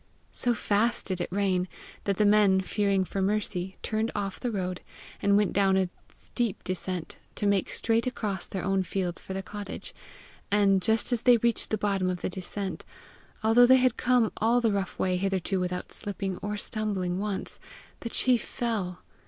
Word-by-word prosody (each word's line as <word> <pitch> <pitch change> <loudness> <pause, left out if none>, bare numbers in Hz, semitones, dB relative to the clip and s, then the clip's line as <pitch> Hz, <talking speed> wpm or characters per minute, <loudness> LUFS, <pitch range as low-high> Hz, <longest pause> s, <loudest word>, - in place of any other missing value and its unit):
So 245 -1 0
fast 220 +3 +1
did 185 -2 -3
it 175 - -3
rain, 190 -2 +1 0.4
that 200 -2 0
the 210 - +4
men, 205 -2 +5
fearing 195 0 +1
for 195 - -3
Mercy, 190 -2 -1
turned 220 +1 -1
off 200 -2 -3
the 245 - -2
road, 185 -4 -3 0.4
and 200 0 +4
went 205 -2 +2
down 195 -1 +3
a 190 -1 +1 0.2
steep 235 -5 -3
descent, 185 -2 -4 0.2
to 210 - -2
make 200 -2 +2
straight 230 +1 +1
across 210 -7 -2
their 190 - -4
own 195 0 +2
fields 185 -2 -2
for 190 - -7
the 195 - -3
cottage; 205 0 -7 0.6
and 200 -2 +4
just 220 +6 +1
as 240 -2 +1
they 245 -1 +6
reached 235 0 0
the 215 - 0
bottom 195 -3 0
of 180 -1 -3
the - - -2
descent, 190 +1 -4 0.6
although 230 +3 +6
they 260 +1 +8
had 255 -1 +3
come 245 -3 +2
all 230 +3 +3
the 230 -2 +2
rough 200 -2 -2
way 185 -1 +1
hitherto 195 0 0
without 180 0 -3
slipping 195 -3 -4
or 210 0 -4
stumbling 200 -4 -1
once, 200 -2 -3 0.4
the 230 - -5
chief 245 0 +2
fell. 205 -8 -3
200 Hz, 180 wpm, -28 LUFS, 190-220 Hz, 0.6 s, they